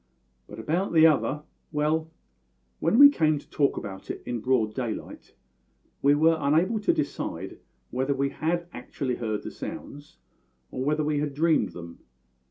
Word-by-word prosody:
"But 105 - -10
about 165 - -1
the 160 -1 +7
other 150 -1 +2 0.3
well, 155 +1 0 0.7
when - - +2
we 285 +2 +11
came 155 - +2
to 145 - -11
talk 140 -3 +1
about 95 -1 -7
it - - -5
in 120 -1 -3
broad 110 -2 +1
daylight 120 -3 -6 0.7
we 140 +1 +5
were 160 +2 +4
unable 165 +10 +2
to 210 - +2
decide 320 -2 -4 0.3
whether 135 +3 0
we 140 +1 0
had 170 +4 -2
actually 130 -4 -4
heard 110 -3 -3
the - - -6
sounds, 145 +1 -9 0.5
or 130 - -3
whether 150 +2 +1
we 150 -1 0
had 145 -1 -3
dreamed 155 - +2
them. 85 -1 -10
145 Hz, 160 wpm, -26 LUFS, 130-160 Hz, 0.7 s, we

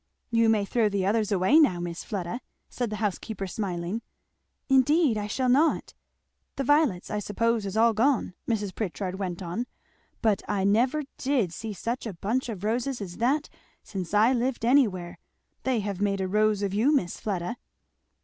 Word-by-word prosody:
"You 230 -1 +4
may 210 -2 +2
throw 220 +1 +2
the 195 -2 -1
others 215 +1 +1
away 200 - +5
now, 185 - +4
Miss 175 -1 -5
Fleda," 200 +3 -4 0.3
said 245 -2 -2
the 215 - -3
housekeeper 210 -1 -3
smiling. 185 +1 -3 0.7
"Indeed 270 0 +4
I 210 -1 -2
shall 255 +5 -1
not! 285 +6 +2 0.3
" - - -51
"The 275 - -2
violets, 290 - +2
I 210 - -1
suppose, 225 +1 0
is 195 +2 -4
all 230 +1 +5
gone," 235 -3 +1 0.2
Mrs. 205 -4 -1
Pritchard 190 -2 -4
went 185 -2 -3
on; 180 +8 -3 0.6
but 215 -4 +3
I 200 -2 0
never 245 +9 +2 0.2
did 255 -11 +1
see 220 +4 -5
such 235 +4 -3
a 210 - -5
bunch 235 +9 -1
of 205 -4 -6
roses 240 +4 -1
as 185 -4 -7
that 275 +6 +1 0.4
since 185 -4 -5
I 215 +5 +4
lived 245 -1 -1
anywhere. 210 -10 +2 0.5
They 255 -4 +1
have 200 -1 -4
made 200 -1 +1
a 190 - -1
rose 210 +1 +2
of 195 -1 -1
you, 225 +8 +3
Miss 185 - 0
Fleda." 200 +3 -3
215 Hz, 180 wpm, -27 LUFS, 195-245 Hz, 0.7 s, away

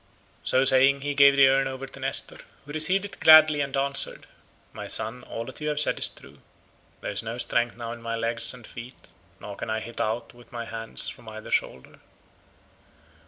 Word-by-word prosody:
So 130 +1 +2
saying 135 +1 +4
he 145 +1 -3
gave 140 0 +5
the 140 -1 +6
urn 135 0 +1
over 135 0 -7
to 135 - -11
Nestor, 135 +1 0 0.3
who 145 - -10
received 180 +6 0
it 200 - -11
gladly 155 -2 +7
and 140 -1 -3
answered, 140 0 +3 0.5
"My - - -8
son, 115 +3 -1
all 115 - -7
that 130 +4 -11
you 150 - -4
have 150 -1 -1
said 150 - +4
is - - +3
true; 70 +1 -16 0.6
there - - -5
is - - -2
no 115 +1 -6
strength 120 -1 -1
now 115 -1 -6
in 120 0 -9
my 115 0 -4
legs 115 0 -1
and 125 -3 -12
feet, 120 +3 -12 0.3
nor 100 - -9
can - - -7
I 110 0 -2
hit 115 +1 -7
out 110 +2 -3
with 120 0 -19
my 120 -1 -6
hands 115 0 -1
from 110 - -9
either 110 0 -10
shoulder. 65 - -3
125 Hz, 205 wpm, -25 LUFS, 115-140 Hz, 0.6 s, gladly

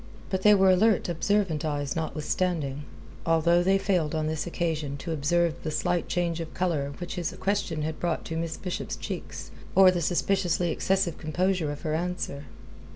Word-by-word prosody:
But 190 -1 0
they 210 +1 +7
were 190 -1 +5
alert, 205 +1 +3
observant 175 -1 +1
eyes 145 -3 -2
notwithstanding, 155 -2 -2 0.4
although 165 +1 +3
they 190 +2 +3
failed 175 -6 0
on 155 -1 0
this 155 +2 -2
occasion 160 -5 -2
to 165 - -5
observe 160 +2 +1
the 155 - -3
slight 170 +2 0
change 170 -1 -1
of 165 -1 -6
colour 155 -6 -1
which 175 - -5
his 175 -2 -1
question 190 -6 -1
had 155 0 -3
brought 170 -2 -1
to 165 - -4
Miss 165 0 -3
Bishop's 180 -2 -4
cheeks - - -6 0.2
or 190 -1 +8
the 175 -1 -1
suspiciously 175 0 +1
excessive 185 -1 0
composure 175 0 0
of 145 - -7
her 155 - -2
answer. 165 -4 -3
170 Hz, 170 wpm, -27 LUFS, 155-185 Hz, 0.4 s, or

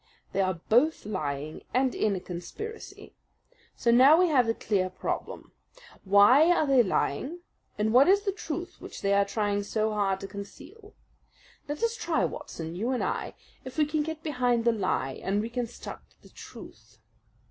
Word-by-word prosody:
They 195 - 0
are 185 -1 0
both 260 +7 +3
lying, 155 -6 -4
and 255 0 +2
in 210 -2 0
a - - -3
conspiracy. 305 - -8 0.6
So 235 - +1
now 265 +6 +7
we 360 0 +4
have 255 -6 +3
the 225 - +1
clear 190 -4 0
problem. 185 - -5 0.5
Why 205 - +6
are 350 - +3
they 270 -3 +5
lying, 265 - -1 0.4
and 220 +1 0
what 260 +5 +7
is 400 +2 +4
the 400 - 0
truth 350 -3 -6
which - - -9
they 200 0 +2
are 200 0 +4
trying 205 0 -1
so 215 +1 -1
hard 195 -2 0
to 195 - -5
conceal? 295 - -11 0.7
Let 295 +8 -4
us 465 0 +1
try, 430 -8 0
Watson, 165 0 -6
you 220 +7 -2
and 255 -2 0
I, - - -3 0.3
if 260 +1 -9
we 305 - +4
can 300 +1 -1
get 315 +1 -5
behind 245 -6 0
the 235 - +5
lie 185 -11 -2
and 200 +2 0
reconstruct 235 +2 -6
the - - -16
truth. - - -13
235 Hz, 170 wpm, -28 LUFS, 200-305 Hz, 0.7 s, now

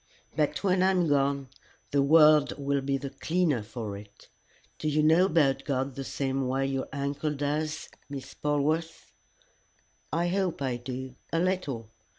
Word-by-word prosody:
"But 150 +4 0
when 185 -2 +3
I 190 - +5
am 180 -3 +2
gone 140 -2 +1 0.4
the 140 - +3
world 150 0 +6
will 140 -1 0
be 135 0 0
the 140 0 -6
cleaner 155 -2 0
for 105 -1 -6
it. 100 0 -13 0.5
Do 155 - -2
you 150 +1 +2
know 165 +4 +5
about 140 -6 +2
God 135 -1 -1
the 135 - -5
same 135 -1 -2
way 135 +1 0
your 135 -1 -2
uncle 140 +2 -2
does, 150 +2 -2 0.2
Miss 140 -2 -7
Polwarth?" 150 +3 -1 1.0
"I 170 +1 +1
hope 190 -2 0
I 130 -3 -1
do 130 +1 -6 0.2
a 165 - +1
little. 165 - -1
140 Hz, 160 wpm, -28 LUFS, 135-160 Hz, 1.0 s, world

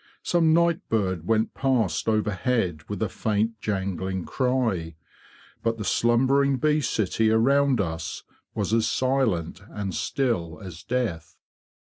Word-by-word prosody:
Some 165 -2 +3
night 170 0 +3
bird 95 -6 -1
went 110 0 +1
past 115 - 0
overhead 105 -4 0
with - - -2
a - - +1
faint 110 +1 -1
jangling 95 -2 -2
cry. 115 - -1 0.7
But 115 0 0
the 105 - -5
slumbering 135 +5 +3
bee 150 +3 +2
city 110 -2 +1
around 135 +3 +3
us 80 -4 -3 0.3
was - - -1
as 115 -1 +3
silent 115 -11 0
and 100 -3 -4
still 90 - -1
as 90 -3 -9
death. 100 -11 -3
110 Hz, 125 wpm, -25 LUFS, 95-130 Hz, 0.7 s, Some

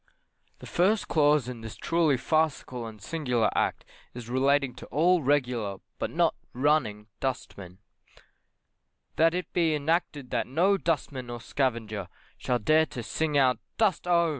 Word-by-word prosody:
The - - -12
First 200 +5 +1
Clause 150 -4 +3
in 125 -2 -6
this 110 -1 -8
truly 165 -5 +1
farcical 140 -5 -1
and 110 -1 -10
singular 125 -2 0
Act - - 0 0.3
is 120 -1 -8
relating 135 0 +2
to - - -10
all 175 +4 +3
'regular' 125 -8 0 0.2
but - - -1
not - - +2 0.2
'running' 125 -6 +1
dustmen: 100 -8 -5 1.4
That 165 +1 +4
it 180 - -4
be 165 -3 +2
enacted 150 -3 -1
that - - 0
no 175 +10 +3
dustman 145 -8 -2
or 120 0 -5
scavenger 115 -7 -2 0.3
shall 125 - 0
dare 155 +7 +3
to 120 - -7
sing 155 +4 -1
out 130 -2 +3 0.2
dust 210 -5 +1
oh! 170 -1 +3
140 Hz, 145 wpm, -27 LUFS, 120-160 Hz, 1.4 s, That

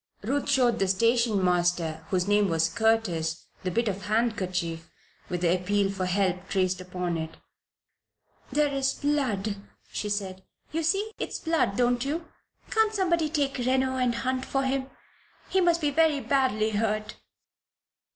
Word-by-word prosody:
Ruth 275 +7 -1
showed 245 -3 +3
the 195 - +2
station 230 0 +2
master, 175 -3 +1
whose 185 0 0
name 205 -1 +3
was 165 0 +2
Curtis, 180 -6 0 0.2
the 185 - -1
bit 230 +6 0
of 195 -1 -3
handkerchief 185 -7 -1 0.4
with 180 -1 -2
the 175 -1 +3
appeal 195 +2 +1
for 185 -2 -2
help 185 -1 0
traced 185 -1 0
upon 180 -2 -3
it. 160 0 -6 1.1
"That 295 -1 +2
is 275 0 0
blood," 225 -9 0 0.3
she 210 - -3
said. 190 -2 -3 0.3
"You 325 +2 -1
see 395 +7 +1
it's - - -3
blood, 320 - 0
don't 245 0 +2
you? 315 +5 -2 0.5
Can't 440 -1 +2
somebody 340 -5 +1
take 285 -3 -1
Reno 260 +1 +1
and 250 -2 +1
hunt 255 +2 -1
for 270 0 -1
him? 265 0 -1 0.6
He 380 - +2
must 345 -1 +3
be 295 -1 +1
very 310 -1 +3
badly 245 -4 +1
hurt." 215 0 -1
220 Hz, 150 wpm, -27 LUFS, 185-270 Hz, 1.1 s, showed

